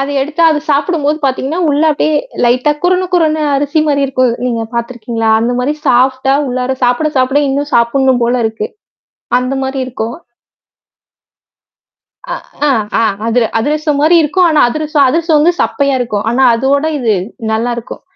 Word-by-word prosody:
அத 275 - -2
எடுத்து 300 +4 -3
அது 310 -1 +1
சாப்பிடும்போது 300 0 0
பார்த்தீங்கன்னா, 275 +5 -1
உள்ள 290 +2 +1
அப்டியே 305 +1 0 0.3
லைட்டா 255 +5 +2
குருண, 365 +1 +1
குருண 315 -3 +2 0.2
அரிசி 290 +3 0
மாரி 285 -2 +1
இருக்கும். 255 -2 +1
நீங்க 230 -2 -2
பார்த்துருக்கீங்களா? 235 -1 -2
அந்த 240 +2 0
மாரி 275 +4 -1
சாஃப்ட்டா 260 +2 +2
உள்ளார 255 0 -2
சாப்பிட 250 +5 +1
சாப்பிட 265 +2 +2
இன்னும் 285 +2 -2
சாப்பிடணும் 245 +1 +2
போல 240 +1 +1
இருக்கு. 220 -1 -4 0.7
அந்த 255 +2 -3
மாரி 265 +1 -3
இருக்கும். 235 -1 -5 2.2
அ - - -1 0.3
ஆ - - +3 0.3
ஆ - - +2 0.3
அதிர 235 +1 +2
அதிரசம் 300 +4 -1
மாரி 315 +4 +4
இருக்கும். 360 +4 +2
ஆனா 310 -1 +3
அதிரசம் 300 +1 +1
அதிரசம் 325 +2 +1
வந்து 330 +4 +3
சப்பையா 280 -1 0
இருக்கும். 210 -4 -2
ஆனா 260 +2 +1
அதோட 275 +4 +1
இது 230 -5 +1 0.4
நல்லாயிருக்கும். 235 +1 -3
270 Hz, 150 wpm, -13 LUFS, 245-300 Hz, 2.2 s, மாரி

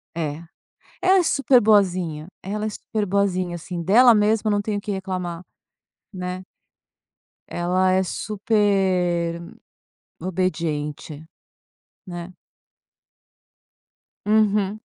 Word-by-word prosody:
É. 155 -2 -3 0.6
Ela 375 +1 +5
é - - +2
super 275 -5 +3
boazinha. 180 -7 +2 0.2
Ela 210 +3 -3
é - - -1
super 215 0 -3
boazinha, 185 -2 0
assim, 175 +1 -6
dela 235 +7 +6
mesma, 215 0 +2
não 205 0 +1
tenho 205 0 -2
o - - -12
que 205 - -4
reclamar, 185 -3 -4 0.7
né. 180 0 -5 1.0
Ela 185 +2 +1
é 190 0 +3
super 190 -4 0 0.8
obediente, 160 -4 -3 0.8
né. 175 0 -7 1.9
Uhum. 210 -1 +2
185 Hz, 95 wpm, -23 LUFS, 175-210 Hz, 1.9 s, dela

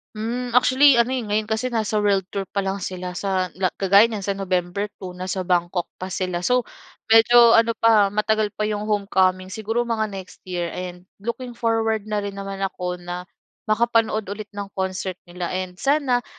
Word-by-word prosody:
Hmm, 235 +3 -3
actually 260 +1 +6
ano, 235 +2 +3
eh, 260 - -1
ngayon 215 -1 -1
kasi 220 +4 -1
nasa 220 -3 0
world 200 -2 +2
tour 200 - -1
pa 200 -1 -2
lang 195 +1 -2
sila 180 0 -5
sa 190 0 -1
la 185 0 0
kagaya 200 +3 +5
niyan 210 -4 -4
sa 200 - 0
November 190 +1 -2
2, 185 -2 -7
nasa 185 +1 -4
Bangkok 175 0 0 0.2
pa 185 - -4
sila. 180 -1 -2
So 250 +5 +2 0.4
medyo 230 +1 +7
ano 230 0 +4
pa, 215 -3 +5
matagal 210 +1 +1
pa 215 - 0
'yong 210 0 -3
homecoming, 190 -2 +1
siguro 225 +3 -1
mga 220 -2 -1
next 190 -2 -9
year 175 -2 -3
and 180 0 -7 0.2
looking 240 +3 -5
forward 225 -2 0
na 210 -1 -1
rin 200 - -4
naman 195 0 -6
ako 180 -2 -3
na 175 0 -6 0.5
makapanood 225 -1 +2
ulit 205 +2 -7
ng 205 -1 -6
concert 190 0 -2 0.2
nila. 175 0 -4
And 185 -1 -4
sana, 270 -2 +1
205 Hz, 185 wpm, -23 LUFS, 185-225 Hz, 0.5 s, medyo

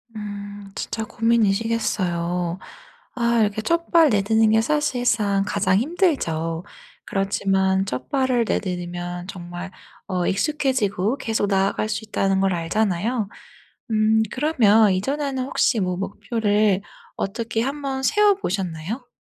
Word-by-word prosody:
음. 205 -1 -7
진짜 220 - -3
고민이시겠어요. 195 -6 0 0.6
아 235 -1 +1
이렇게 210 0 +1
첫발 335 +1 +3
내딛는 220 +1 +3
게 220 +1 +4
사실상 235 -7 +1
가장 190 -2 +2
힘들죠. 195 - 0 0.4
그렇지만 195 -1 +1
첫발을 245 - 0
내딛으면 175 -2 -3
정말 175 -1 -7 0.4
어 180 -3 -1
익숙해지고 250 - 0
계속 220 -2 0
나아갈 195 +2 +1
수 215 +1 -3
있다는 195 -2 0
걸 190 -2 +2
알잖아요. 200 +5 0 0.6
음. 220 0 +3
그러면 225 -8 +4
이전에는 270 +6 -1
혹시 245 -4 +1
뭐 180 -1 -1
목표를 205 0 0 0.3
어떻게 225 +3 -2
한번 275 0 -3
세워 415 +6 +4
보셨나요? 195 - -4
210 Hz, 270 characters per minute, -23 LUFS, 190-235 Hz, 0.6 s, 게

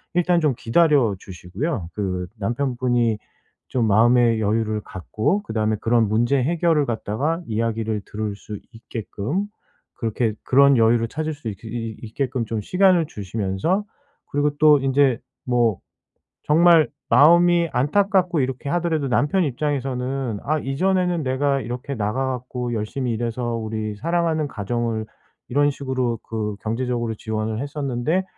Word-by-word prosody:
일단 175 -1 +3
좀 145 -6 +2
기다려 130 -3 +3
주시고요. 95 - -5
그 90 -3 -2
남편분이 120 -1 0 0.5
좀 120 -3 0
마음의 115 +1 +4
여유를 110 0 0
갖고 110 - -2
그다음에 110 - 0
그런 115 -1 +2
문제 120 +5 +2
해결을 160 -1 +2
갖다가 135 - -2
이야기를 110 -1 -1
들을 105 -1 -4
수 105 0 -8
있게끔 115 - -4 0.6
그렇게 115 -1 0
그런 140 +1 +5
여유를 115 0 +3
찾을 155 +4 -3
수 145 -5 -9
있 105 - -3
그 115 - -10
이 115 -1 -4
있게끔 125 +2 -2
좀 110 0 -3
시간을 180 - +3
주시면서 105 - -2 0.4
그리고 145 0 0
또 150 -2 +6
인제 135 -2 +2 0.3
뭐 120 -5 +2 0.7
정말 165 +1 +5 0.2
마음이 170 +6 +5
안타깝고 180 - +2
이렇게 130 +1 -2
하더라도 165 -5 0
남편 150 +8 +2
입장에서는 135 -3 -2
'아. 155 +2 0
이전에는 180 +4 0
내가 135 +1 +1
이렇게 125 +4 -5
나가 110 +4 -1
갖고 125 -1 -4
열심히 115 +3 -2
일해서 120 +1 -2
우리 110 -1 -4
사랑하는 165 +1 0
가정을 115 0 -2 0.4
이런 145 +3 +3
식으로 130 -4 -2
그 105 -2 -4
경제적으로 120 0 -2
지원을 110 0 -3
했었는데 145 +4 -1
125 Hz, 315 characters per minute, -22 LUFS, 110-150 Hz, 0.7 s, 또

